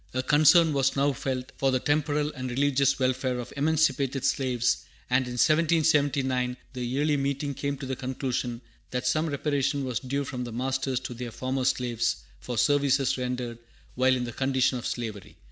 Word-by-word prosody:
A 130 - 0
concern 155 +3 +5
was 135 -1 +2
now 140 +1 +2
felt 130 0 -4
for 135 - +2
the 130 -1 +2
temporal 150 +1 0
and 130 -2 -5
religious 140 +1 +2
welfare 130 -1 0
of 125 0 -5
the - - -9
emancipated 140 -3 +1
slaves, 130 -4 +1 0.3
and 125 0 +2
in 125 - -5
1779 145 -4 +2 0.2
the 125 -1 -4
Yearly 145 +5 +1
Meeting 140 +1 -1
came 140 +1 -3
to 135 - -7
the 130 0 -3
conclusion 125 -2 -3 0.3
that 125 0 -3
some 155 +1 +1
reparation 140 -1 0
was 125 -4 -2
due 140 +2 -2
from 125 -2 -5
the 120 - -6
masters 130 +1 -1
to 125 - -6
their 120 0 -6
former 130 +2 -2
slaves 120 -3 +1 0.2
for 120 -2 -5
services 135 +2 +2
rendered 125 -2 -3 0.3
while 130 +1 +3
in 125 - -2
the 120 -1 -5
condition 130 -1 +1
of 120 - -4
slavery. 110 -5 -5
130 Hz, 180 wpm, -27 LUFS, 125-140 Hz, 0.3 s, concern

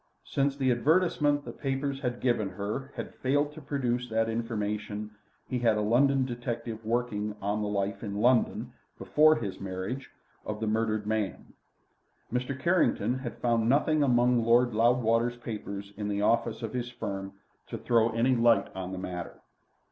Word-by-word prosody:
Since 140 0 0
the 130 -2 +2
advertisement 150 +1 +2
the - - -5
papers 135 0 -2
had 125 -3 -3
given 120 -5 +1
her 105 +9 -4
had - - -6
failed 145 +3 0
to 155 - -10
produce 125 -3 -2
that 115 0 +1
information 105 -2 -3 0.4
he 125 - -2
had 115 -3 +3
a - - +1
London 130 +5 +3
detective 120 -2 -4
working 110 -2 -1
on 105 +2 -1
the 105 - -1
life 100 -1 -2
in 100 -2 -4
London, 120 +2 +2 0.2
before 155 +1 +4
his 105 -7 -4
marriage, 95 +8 -5 0.3
of 105 0 -4
the 110 - -1
murdered 110 -1 0
man. 105 -3 -2 0.8
Mr. 125 +2 -2
Carrington 130 - +2
had 125 -3 -6
found 115 -1 +1
nothing 150 +3 +3
among 125 -3 +3
Lord 120 +1 +4
Loudwater's 120 +1 +2
papers 100 -4 -6
in 105 0 -4
the 100 0 -1
office 115 0 +1
of 110 - -4
his 120 -1 -2
firm 100 -5 -5 0.3
to - - -5
throw 115 -1 +3
any 115 +3 +2
light 115 -3 +3
on 95 0 -5
the - - -4
matter. 90 -2 -6
115 Hz, 165 wpm, -29 LUFS, 105-130 Hz, 0.8 s, before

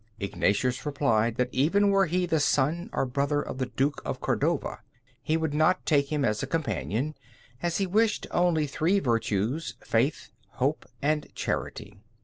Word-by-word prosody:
Ignatius 105 +5 0
replied 120 -6 +1
that 125 0 0
even 200 +10 +3
were 195 -1 +4
he 180 +3 +1
the 160 -2 +1
son 150 - +1
or - - 0
brother 140 +3 0
of 130 - -5
the 130 - -1
Duke 135 +4 -1
of - - -4
Cordova, - - -1 0.4
he 155 - +1
would 160 -2 -1
not 155 +5 +2
take 140 -2 +2
him 150 -2 +1
as 105 -1 0
a 135 - -3
companion, 135 - -2 0.5
as 170 -1 0
he 195 - +1
wished 210 +3 +1
only 175 -3 +2
three 160 +7 +1
virtues, 115 - 0
Faith, 125 +7 0 0.2
Hope, - - -1 0.2
and 150 +1 +1
Charity. 100 -1 -4
145 Hz, 160 wpm, -27 LUFS, 125-165 Hz, 0.5 s, were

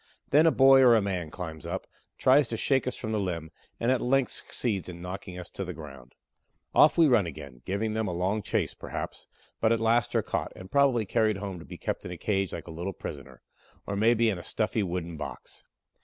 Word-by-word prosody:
Then 155 +4 +6
a - - +6
boy 135 -1 +7
or 120 -3 +7
man 95 -5 -2
climbs 80 -3 -7
up, - - -4 0.3
tries 135 +1 +5
to 115 - -3
shake 130 +2 +1
us 125 - -1
from 110 - -5
the 110 - 0
limb, 85 -5 -3 0.3
and 120 +2 +2
at 130 - +1
length 130 0 +2
succeeds 100 -7 -3
in 85 -1 -8
knocking 90 +1 -7
us 90 - -7
to 100 - -4
the 90 -2 -6
ground. 70 -5 -11 0.6
Off 150 - +6
we 165 -2 +6
run 115 -9 +4
again, 70 -6 -9
give 100 +2 -2
them 110 0 -1
a - - -2
long 95 +5 0
chase, - - -1
perhaps, - - -6 0.3
but 110 - +3
at 115 - +2
last 115 0 +2
are - - +3
caught, - - -3
and 95 +1 -11
probably 135 -5 +3
carried 110 0 +1
home 100 -3 -5
to - - -11
be - - -9
kept - - -3
in - - -6
a 90 - -6
cage 95 +1 -1
like - - -6
a 85 - -9
little 85 +4 -4
prisoner, - - -9 0.4
or 100 - -3
maybe 115 +2 +3
in 95 - -4
a - - -9
stuffy 110 0 -1
wooden 85 -3 -3
box. - - -8
100 Hz, 225 wpm, -28 LUFS, 90-115 Hz, 0.6 s, boy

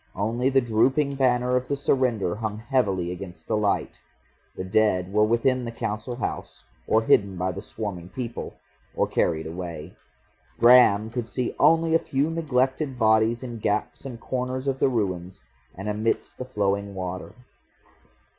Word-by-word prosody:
Only 115 +6 0
the 135 0 +3
drooping 130 +5 +2
banner 125 -2 +2
of 125 0 0
the 140 - 0
surrender 125 -9 +1
hung 105 0 -4
heavily 105 -7 0
against 90 0 -9
the - - 0
light. 105 -2 -1 0.5
The - - -4
dead 95 -2 +1
were 105 0 +4
within 125 +3 +1
the 115 - -4
Council 115 +2 -4
House, 130 - -5 0.2
or 110 +1 +3
hidden 100 -4 +3
by 90 +1 -1
the - - -7
swarming 90 -5 -6
people, 120 +2 -6 0.4
or - - +2
carried 80 -2 0
away. 85 -1 -6 0.7
Graham 115 -3 +6
could 115 -2 -4
see 125 +1 -2
only 165 +2 +4
a 165 - +5
few 145 -1 -1
neglected 135 -3 0
bodies 110 +1 +3
in 120 -2 -6
gaps 105 0 -2
and 125 -4 -7
corners 130 +1 -3
of 135 -1 -1
the - - +3
ruins, 95 -6 -2 0.4
and 95 +2 -7
amidst 105 +2 -2
the 125 - -4
flowing 100 -4 -1
water. 90 -1 -5
115 Hz, 155 wpm, -25 LUFS, 100-130 Hz, 0.7 s, Graham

